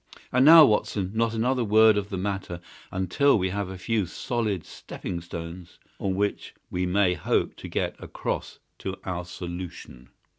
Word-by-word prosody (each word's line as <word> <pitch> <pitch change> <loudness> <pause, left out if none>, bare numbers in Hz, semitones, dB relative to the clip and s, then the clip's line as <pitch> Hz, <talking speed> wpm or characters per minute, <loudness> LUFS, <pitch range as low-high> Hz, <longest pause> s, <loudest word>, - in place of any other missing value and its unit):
And 125 +1 +4
now, 160 +1 +10
Watson, 105 -4 0
not 115 0 0
another 125 +2 +1
word 110 0 +6
of 100 0 -2
the 95 - -3
matter 95 -2 -3 0.3
until 95 +9 +2
we 95 -1 0
have 100 -1 -3
a 95 - -7
few 105 0 -1
solid 105 - -2
stepping 85 -2 -7
stones 85 +1 -8 0.2
on 95 -1 -1
which 100 +1 -2 0.2
we 90 0 -1
may 95 0 +3
hope 85 - 0
to - - -8
get - - -2
across - - -4 0.2
to 95 0 -4
our 90 -1 -4
solution." 85 -8 -8
95 Hz, 160 wpm, -26 LUFS, 90-110 Hz, 0.3 s, now